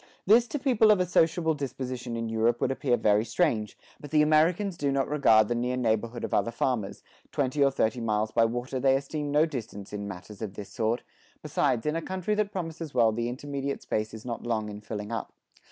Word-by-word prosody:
This 235 +4 +5
to 295 - -3
people 250 -6 +3
of 210 -3 +5
a 180 - +2
sociable 165 -1 +2
disposition 130 -4 -4
in 115 0 -2
Europe 115 +1 +1
would - - +1
appear 130 -2 +1
very 105 0 +3
strange, 115 - 0 0.2
but 145 - -9
the 150 +1 +4
Americans 165 +6 +3
do 145 -3 -1
not 135 -1 +1
regard 115 -8 +4
the 120 - 0
near 125 +1 -1
neighborhood 115 0 -1
of - - -3
other - - +2
farmers; 115 -3 -2 0.3
twenty 140 +1 +1
or 140 - +5
thirty 120 -2 0
miles 110 -1 0
by 115 0 +4
water 120 +3 -3
they 135 +1 +4
esteem 145 +2 -3
no 150 +2 +4
distance 110 -9 -7
in 100 -1 -4
matters 95 +2 -9
of 105 -3 -5
this 100 - -8
sort; 115 +2 -1 0.4
besides 140 -5 0
in 150 +1 0
a 165 - -1
country 190 +4 -2
that 210 -1 0
promises 165 -6 -5
well 115 -3 +5
the 115 +2 -2
intermediate 140 +2 -4
space 110 0 -2
is 110 +1 -10
not 120 -2 -4
long 110 -3 -2
in 105 0 -8
filling 105 0 -6
up. 115 -2 -4
125 Hz, 215 wpm, -28 LUFS, 110-150 Hz, 0.4 s, This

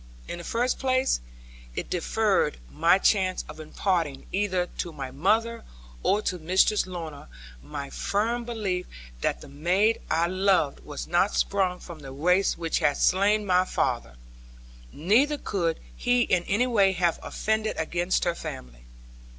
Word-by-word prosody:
In 175 - -5
the - - -8
first 240 +7 0
place, 260 - +1 0.5
it - - -3
deferred - - +1
my 170 +4 +4
chance 190 -2 +2
of - - -10
imparting 155 -2 -1
either 185 -3 0
to 175 - -2
my 135 -4 -6
mother 220 - +1 0.4
or 210 - +2
to 180 - -2
Mistress 185 +5 +3
Lorna 165 - -7 0.3
my 140 - -7
firm 230 +4 -1
belief 210 -6 -3 0.3
that - - -1
the - - -10
maid 180 +10 +1
I 165 +2 +2
loved 185 -4 +2
was 145 -1 -7
not 175 +4 +2
sprung 185 -2 +1
from 170 -3 -10
the 135 -2 -9
race 180 +8 +2
which 165 -1 -1
had 145 -1 +2
slain 205 +3 +3
my 185 -1 +4
father; 120 - -1 0.8
neither 235 - +2
could 170 - -1 0.2
he 245 0 +2
in 180 -5 +1
any 210 +6 +2
way 200 -6 +3
have 175 -2 +1
offended 220 0 -1
against 175 +3 0
her 175 - +1
family. - - -8
180 Hz, 150 wpm, -26 LUFS, 160-210 Hz, 0.8 s, my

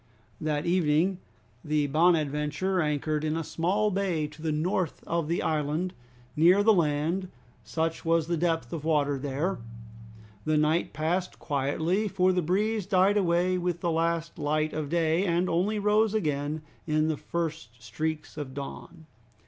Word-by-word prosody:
That 155 0 -1
evening 175 +1 +2 0.4
the 150 -1 +1
"Bonadventure" 155 +3 +1
anchored 150 0 -1
in 155 +1 0
a 165 - -2
small 195 +7 0
bay 185 -5 0
to 155 +1 -14
the 160 -1 -1
north 165 +2 -1
of 170 -2 -1
the 170 +2 0
island, 155 +4 -1 0.4
near 180 +6 +5
the 220 +1 +6
land, 165 +2 0 0.3
such 165 0 -2
was 165 -1 +2
the 170 +1 -1
depth 165 0 -1
of 160 -3 -4
water 145 -3 +1
there. 145 +7 -2 0.8
The 155 0 +1
night 155 +3 +2
passed 175 +4 -1
quietly, 160 +8 0
for 185 -1 +2
the 180 - +1
breeze 205 +4 0
died 195 0 +4
away 180 -1 +2
with 175 -1 -2
the 170 - 0
last 165 0 -1
light 155 +1 0
of 155 -2 -3
day, 165 +1 +2
and 175 -1 +1
only 185 +6 +1
rose 210 +1 +2
again 150 -4 -1 0.2
with 155 0 +2
the 160 - 0
first 160 -10 -4
streaks 155 +2 -4
of 140 -3 -6
dawn. 160 +4 -8
165 Hz, 155 wpm, -28 LUFS, 150-180 Hz, 0.8 s, the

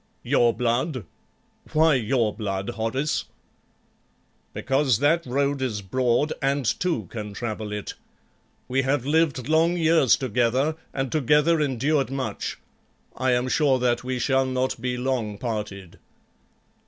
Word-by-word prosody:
"Your 120 -1 +3
blood! 125 - -1 0.7
Why 160 0 +5
your 115 -3 +1
blood, 100 0 -3
Horace?" 120 +6 -1 1.3
"Because 135 -3 +1
that 155 +6 +2
road 140 +2 0
is 110 -6 -2
broad 125 +7 +1
and 140 0 0
two 170 -11 0
can 105 -3 -6
travel 110 -1 -4
it. 105 -1 -5 0.7
We 130 +1 +1
have 135 -1 0
lived 145 -4 +1
long 165 +3 +3
years 160 -7 +4
together 130 +4 +1 0.2
and 135 -1 -3
together 150 +2 +3
endured 140 0 +1
much; 135 -1 -4 0.6
I 130 -1 +1
am 125 +1 +1
sure 135 0 +3
that 125 -1 0
we 130 0 -2
shall 130 +1 +1
not 130 -1 -1
be 125 0 -2
long 125 -5 -2
parted." 105 -6 -5
130 Hz, 130 wpm, -24 LUFS, 115-145 Hz, 1.3 s, Why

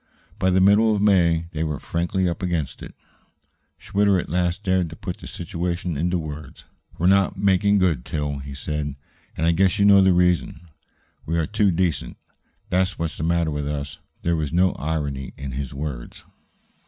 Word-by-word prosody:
By 95 -1 +2
the 95 0 +3
middle 105 +3 +5
of - - -1
May 85 -5 +3
they 80 0 -2
were 75 -4 -2
frankly 90 +2 -1
up 85 -1 -3
against 85 -6 -2
it. - - -10 0.8
Schwitter 100 -1 +2
at - - -6
last 90 +3 0
dared 95 -3 +1
to 80 - -9
put - - -6
the - - -10
situation 85 0 -3
into 90 +5 0
words. 75 -3 -8 0.3
"We're 85 - -1
not 95 +1 +3
making 100 +1 +3
good, 85 -10 +1
Til," 75 -1 -3
he 70 0 -8
said. 75 0 -3 0.4
"And 80 - 0
I 85 - +4
guess 95 +2 +2
you 100 - +3
know 100 -1 +7
the 95 0 +5
reason. 90 -1 +1 0.6
We 85 +2 0
are 80 - +1
too 105 +1 +2
decent; 85 -3 -1 0.5
that's 95 +1 0
what's 85 -1 -3
the - - -5
matter 85 -1 +1
with 75 -1 -3
us." 70 -1 -4 0.2
There 85 0 +1
was 75 -3 -2
no 90 +2 +3
irony 70 -3 -3
in 70 -1 -6
his 65 0 -4
words. 70 -4 -6
85 Hz, 185 wpm, -23 LUFS, 75-95 Hz, 0.8 s, know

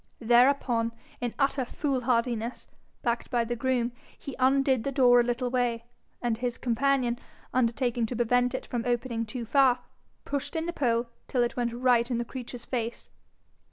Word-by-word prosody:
Thereupon, 240 -1 +3 0.3
in 245 -2 -3
utter 275 -1 +1
fool 265 +1 -2
hardiness, 235 -1 -1 0.4
backed 235 -1 -1
by 240 -3 +1
the 240 +1 -3
groom, 245 0 0 0.3
he 280 - -7
undid 265 -2 +3
the 275 - -1
door 250 -2 +6
a - - +5
little 245 +1 -1
way, 240 -2 0 0.4
and, 230 -2 0
his 245 -1 -2
companion 250 0 +1 0.3
undertaking 240 -1 +1
to 245 - -4
prevent 245 +2 +2
it - - -4
from 240 -2 -3
opening 235 -2 -1
too 235 +2 -5
far, 260 +1 +4 0.5
pushed 285 +1 -3
in 320 0 -1
the 345 - -3
pole 235 -5 +1 0.2
till 250 -2 +1
it 240 - -2
went 240 -1 0
right 240 -1 +3
in 245 - 0
the 235 - -2
creature's 245 -1 -8
face. 235 -2 -4
245 Hz, 170 wpm, -28 LUFS, 235-260 Hz, 0.5 s, door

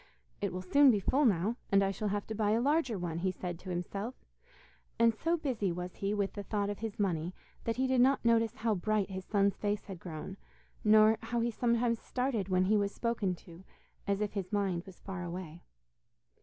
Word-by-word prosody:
'It 200 -2 0
will 185 +1 -5
soon 280 +9 +6
be 215 -5 +4
full 275 +9 +2
now, 210 +2 +2
and 195 0 +5
I 195 - +1
shall 210 +2 -3
have 205 0 -1
to 220 - -5
buy 210 -1 +1
a 225 - +3
larger 270 -3 +1
one,' 170 -2 -3
he 185 +2 +1
said 180 -2 -5
to 185 - -9
himself, 195 +7 -3 0.8
and 230 0 +5
so 330 +9 0
busy 245 - -1
was 180 +1 -5
he 200 0 -1
with 200 -2 -1
the 205 - -5
thought 205 0 -1
of 205 - -6
his 220 -2 -5
money, 175 -3 -1 0.3
that 230 - 0
he 260 - +1
did 260 -1 +3
not 265 -1 +3
notice 230 -1 +3
how 220 0 0
bright 205 +1 0
his 190 0 -5
son's 200 -1 +2
face 205 0 -1
had 190 -4 -8
grown, 160 -3 -7 0.5
nor 215 +1 +6
how 230 +1 -2
he 235 +1 +1
sometimes 235 0 +1
started 250 -7 -1
when 185 0 +3
he 210 +3 +3
was 200 -1 +1
spoken 220 -6 -1
to, 170 +1 -14 0.4
as 200 +1 0
if 210 - -1
his 195 -3 -4
mind 195 -4 0
was 190 - -12
far 190 -2 -6
away. 175 -1 -6
205 Hz, 215 wpm, -32 LUFS, 185-230 Hz, 0.8 s, soon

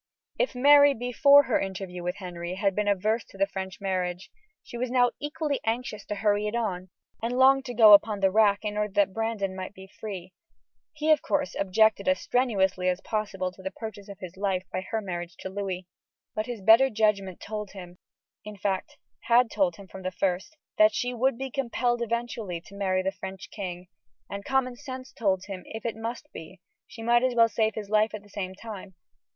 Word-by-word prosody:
If - - 0
Mary, 285 +2 +7
before 280 +4 +5
her 250 - +1
interview 190 -2 -5
with 180 +1 -2
Henry, 175 -2 -6
had 195 0 +1
been 210 +2 -1
averse 215 +3 +1
to - - -16
the 195 - +3
French 190 -1 -6
marriage, 185 -2 -2 0.3
she - - -11
was 245 +1 -2
now 245 -1 +3
equally 295 -1 -2
anxious 225 -1 -2
to 210 - -3
hurry 205 0 +1
it 210 - -3
on, 190 -6 -2 0.3
and 240 +2 -2
longed 265 +1 +5
to 245 - -6
go 215 -2 +9
upon 205 0 +5
the 195 -1 +3
rack 205 0 +3
in 210 0 -2
order 210 -2 -1
that 200 -1 +2
Brandon 225 -4 -2
might 190 +2 -6
be 190 - -11
free. 190 -4 -7 0.6
He, 310 0 +1
of 310 - +5
course, 285 -1 -1
objected 200 +1 +2
as 185 0 +3
strenuously 190 -7 +1
as 180 0 0
possible 200 -4 -2
to 185 - -15
the 190 - -3
purchase 210 -1 -8
of 200 - -9
his 185 0 -9
life 190 -2 0
by 185 - -1
her 220 +3 -3
marriage 175 -3 -5
to 190 - -5
Louis, 190 -2 -4 0.5
but 215 +1 -3
his 240 -4 -5
better 225 +6 +7
judgment 210 -5 0
told 210 -2 -6
him 180 -2 -11 0.4
in 210 -1 -9
fact, 190 -1 -2 0.3
had 235 0 +4
told 190 -5 +1
him 195 +1 -13
from 190 - -10
the 185 - -2
first 185 - -2 0.2
that 215 0 +6
she 245 0 -1
would 245 +1 +1
be 265 0 -5
compelled 240 -2 0
eventually 235 -6 -3
to 195 - -15
marry 185 -2 0
the 190 - 0
French 190 -1 -8
king, 180 -3 -6 0.4
and 200 0 -5
common 265 -2 +1
sense 260 -1 -8
told 190 -4 0
him 195 -2 -6
if 220 +1 -8
it 230 - -2
must 230 +2 -5
be, 165 +4 -10 0.3
she 225 - -10
might 240 +1 +4
as 255 -1 +1
well 230 -1 +6
save 220 -1 0
his 210 -2 -6
life 215 0 +3
at 210 - -9
the 205 - -19
same 190 -2 -5
time. 200 -3 -9
210 Hz, 205 wpm, -27 LUFS, 190-235 Hz, 0.6 s, go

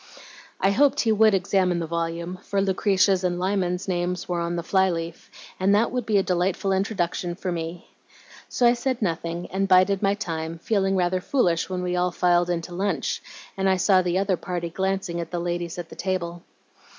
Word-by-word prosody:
"I 195 - +3
hoped 280 +6 +3
he 225 - +2
would 215 -1 +5
examine 185 -1 +1
the 170 - -2
volume, 170 +2 -3
for 200 - -2
Lucretia's 195 -1 +2
and 175 -1 0
Lyman's 185 -1 -1
names 180 -1 -2
were 175 -1 -1
on 170 0 -2
the 170 - -3
fly 190 +1 +2
leaf, 165 -1 -5 0.3
and 195 +2 +3
that 225 +3 +2
would 250 -3 -3
be 215 -2 +3
a 195 - +3
delightful 185 +2 0
introduction 185 -3 -1
for 185 0 -4
me. 165 +1 -5 0.6
So 245 - +1
I 240 - +6
said 250 -1 -2
nothing 170 -1 -2
and 195 +1 0
bided 190 +1 +4
my 200 -1 +2
time, 165 -5 -4
feeling 195 +2 0
rather 185 0 +1
foolish 180 -9 +1
when 180 -1 -3
we 180 0 -1
all 180 0 +1
filed 175 0 +2
in 175 -1 0
to 175 - -9
lunch, 185 -5 -1 0.3
and 195 0 +1
I 190 - +3
saw 185 0 +4
the 180 0 0
other 190 -1 +1
party 175 -1 -4
glancing 190 -1 -2
at 165 - -6
the 175 - -3
ladies 175 0 -3
at 170 -2 -6
the - - -11
table. 175 -2 -3
180 Hz, 200 wpm, -24 LUFS, 175-195 Hz, 0.6 s, I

